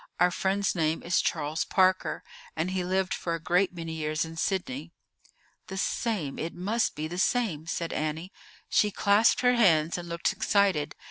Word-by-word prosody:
"Our 180 Hz, +1 st, +4 dB
friend's 190 Hz, +2 st, 0 dB
name 160 Hz, -2 st, 0 dB
is 180 Hz, +1 st, +2 dB
Charles 155 Hz, 0 st, -1 dB
Parker, 185 Hz, -1 st, +1 dB, 0.3 s
and 165 Hz, +3 st, -1 dB
he 185 Hz, -1 st, -1 dB
lived 185 Hz, +1 st, 0 dB
for 170 Hz, -1 st, -2 dB
a -, -, -5 dB
great 180 Hz, +4 st, +2 dB
many 165 Hz, -2 st, -6 dB
years 155 Hz, 0 st, -1 dB
in 160 Hz, 0 st, -9 dB
Sydney." 195 Hz, -, -3 dB, 0.7 s
"The 190 Hz, -, -6 dB
same; 190 Hz, -, -2 dB
it 165 Hz, -, -4 dB
must 210 Hz, +6 st, 0 dB
be 155 Hz, +1 st, -3 dB
the 175 Hz, +3 st, -5 dB
same," 190 Hz, -9 st, 0 dB
said 165 Hz, 0 st, -3 dB
Annie. 155 Hz, +4 st, -3 dB, 0.4 s
She 210 Hz, -, +3 dB
clasped 205 Hz, +2 st, +3 dB
her 250 Hz, 0 st, +4 dB
hands 170 Hz, -8 st, +3 dB
and 175 Hz, -1 st, -8 dB
looked 170 Hz, +5 st, 0 dB
excited. 195 Hz, -7 st, +1 dB
180 Hz, 175 wpm, -28 LUFS, 160-195 Hz, 0.7 s, Our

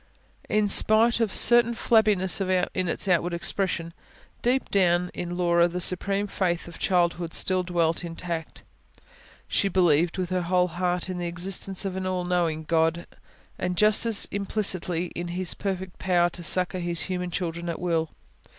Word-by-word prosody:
In 215 Hz, -1 st, +1 dB
spite 220 Hz, +4 st, +4 dB
of 225 Hz, -4 st, 0 dB
a -, -, -7 dB
certain 240 Hz, -1 st, +6 dB
flabbiness 210 Hz, -5 st, +2 dB
in 185 Hz, -1 st, -1 dB
its 170 Hz, -, -1 dB
outward 175 Hz, -1 st, +1 dB
expression, 170 Hz, -1 st, -2 dB, 0.5 s
deep 255 Hz, +2 st, 0 dB
down 180 Hz, -2 st, +2 dB
in 175 Hz, 0 st, -5 dB
Laura 170 Hz, -1 st, +3 dB
the 175 Hz, +1 st, -5 dB
supreme 195 Hz, +3 st, +1 dB
faith 180 Hz, -4 st, -2 dB
of 170 Hz, -, -12 dB
childhood 175 Hz, -2 st, 0 dB
still 185 Hz, -1 st, +1 dB
dwelt 170 Hz, -2 st, -1 dB
intact: 165 Hz, -1 st, -6 dB, 0.8 s
she 200 Hz, -, 0 dB
believed, 175 Hz, -3 st, +2 dB
with 185 Hz, -1 st, -3 dB
her 185 Hz, 0 st, 0 dB
whole 180 Hz, +1 st, +1 dB
heart, 180 Hz, +1 st, -2 dB
in 185 Hz, -1 st, -5 dB
the 175 Hz, -, -3 dB
existence 185 Hz, +2 st, -1 dB
of 190 Hz, -1 st, -4 dB
an 190 Hz, 0 st, -4 dB
all 180 Hz, -1 st, -2 dB
knowing 170 Hz, -3 st, -1 dB
God, 165 Hz, +1 st, 0 dB, 0.5 s
and 180 Hz, 0 st, -3 dB
just 215 Hz, +3 st, +4 dB
as 225 Hz, -3 st, +3 dB
implicitly 185 Hz, -4 st, -1 dB
in 175 Hz, 0 st, -4 dB
His 180 Hz, 0 st, -2 dB
perfect 190 Hz, -2 st, -5 dB
power 175 Hz, -2 st, +1 dB
to 175 Hz, -, -8 dB
succour 180 Hz, +2 st, +1 dB
His 170 Hz, -1 st, -1 dB
human 180 Hz, -1 st, -3 dB
children 170 Hz, -1 st, -4 dB
at 170 Hz, -, -4 dB
will. 165 Hz, -3 st, -1 dB
180 Hz, 165 wpm, -25 LUFS, 170-190 Hz, 0.8 s, certain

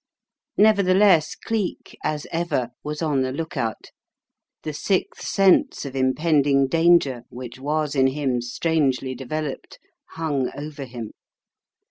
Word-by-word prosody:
Nevertheless 195 Hz, -5 st, +4 dB
Cleek, 220 Hz, -5 st, -4 dB
as 150 Hz, -1 st, -2 dB
ever, 155 Hz, -8 st, -1 dB
was 150 Hz, +2 st, -4 dB
on 145 Hz, -4 st, +1 dB
the 130 Hz, 0 st, -1 dB
look 160 Hz, +4 st, -5 dB
out* 115 Hz, -5 st, -3 dB, 0.7 s
The 155 Hz, -, -4 dB
sixth 185 Hz, +5 st, -1 dB
sense 195 Hz, -, +3 dB
of 135 Hz, -1 st, -6 dB
impending 140 Hz, +1 st, +2 dB
danger 165 Hz, -5 st, +3 dB
which 125 Hz, 0 st, -9 dB
was 150 Hz, +1 st, -1 dB
in 135 Hz, -2 st, +4 dB
him 130 Hz, -3 st, -1 dB
strangely 135 Hz, 0 st, 0 dB
developed 140 Hz, +3 st, -5 dB, 0.4 s
hung 145 Hz, -5 st, -1 dB
over 145 Hz, -1 st, -6 dB
him. 120 Hz, -4 st, -7 dB
150 Hz, 120 wpm, -23 LUFS, 130-165 Hz, 0.7 s, Nevertheless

